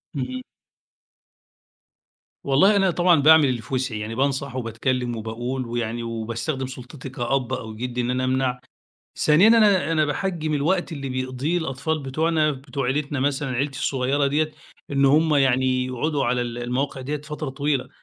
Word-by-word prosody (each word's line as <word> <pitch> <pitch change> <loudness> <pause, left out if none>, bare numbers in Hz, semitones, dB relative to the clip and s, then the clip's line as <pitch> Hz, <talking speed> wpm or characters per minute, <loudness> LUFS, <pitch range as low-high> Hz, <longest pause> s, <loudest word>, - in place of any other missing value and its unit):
اهم. 130 -1 -4 2.0
والله، 145 +10 +4
أنا 195 -2 +3
طبعًا 175 -3 +4
باعمل 155 0 +7
اللي 120 -3 -2
في 130 - -10
وسعي، 125 -4 -1
يعني 110 +2 -5
بانصح 135 0 -1
وباتكلم 125 +1 -2
وباقول، 120 +4 -4
ويعني 120 0 -3
وباستخدم 115 +4 -3
سلطتي 130 +1 -9
كأب 130 0 -1
أو 110 -4 -5
جد 125 +2 -5
إن 120 0 0
أنا 130 0 0
أمنع. 130 -1 0 0.6
ثانيًا، 155 +8 +5
أنا 210 -7 +5
أنا 155 -1 +3
باحجّم 155 +1 -2
الوقت 170 +6 0
اللي 140 -4 -5
بيقضيه 130 +5 -2
الأطفال 160 0 -2
بتوعنا 155 +3 +1
بتوع 135 -1 -5
عيلتنا 140 +2 -1
مثلًا 135 0 0
عيلتي 135 +1 -2
الصغيرة 135 +1 +1
ديّة، 155 +2 0 0.4
إن 140 0 +3
هم 150 +2 +4
يعني 130 -1 +2
يقعدوا 135 +3 -1
على 125 +1 +1
ال 120 -1 -4
المواقع 125 +3 -2
ديّة 145 +4 -3
فترة 150 -1 -5
طويلة، 140 0 -1
135 Hz, 155 wpm, -23 LUFS, 125-150 Hz, 2.0 s, باعمل